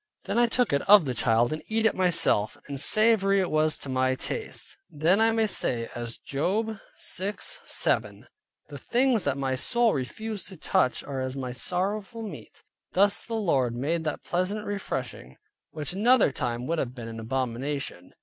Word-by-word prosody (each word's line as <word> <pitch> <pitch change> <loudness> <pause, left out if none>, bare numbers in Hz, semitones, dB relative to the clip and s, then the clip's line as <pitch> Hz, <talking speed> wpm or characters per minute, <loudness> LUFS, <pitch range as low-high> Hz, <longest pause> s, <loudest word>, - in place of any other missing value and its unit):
Then - - 0
I 240 - +5
took 245 - +1
it 140 - +2
of 205 -5 +8
the 130 - -2
child, 120 +2 +3
and 155 - -5
eat 220 0 0
it 225 - +4
myself, 170 - +3
and 140 -2 -1
savory 200 +2 +4
it 185 - -1
was 155 0 +2
to - - -5
my 130 0 +1
taste. 440 - -6
Then 170 +8 +2
I 225 0 +4
may 225 0 +2
say 120 - -2
as 120 -1 -5
Job 200 +9 -2 0.4
6.7, 200 +2 -2 0.5
"The - - -8
things 245 -4 +1
that 140 -1 0
my 135 -1 -1
soul 235 - +2
refused 210 - -4
to 190 -1 -9
touch 130 - +1
are 135 -2 -4
as 130 0 -3
my 130 -2 -4
sorrowful 195 - -3
meat." 195 -9 -10 0.3
Thus 200 +2 +3
the 230 - -5
Lord 135 - +1
made 160 +7 -1
that 155 - -3
pleasant 190 +4 -2
refreshing, 130 - -5 0.3
which 155 +2 -5
another 225 - +4
time 120 -1 -3
would 165 +2 -1
have 125 -3 -3
been 120 -3 -7
an 115 0 -7
abomination. 130 -2 -4
160 Hz, 175 wpm, -27 LUFS, 130-210 Hz, 0.5 s, of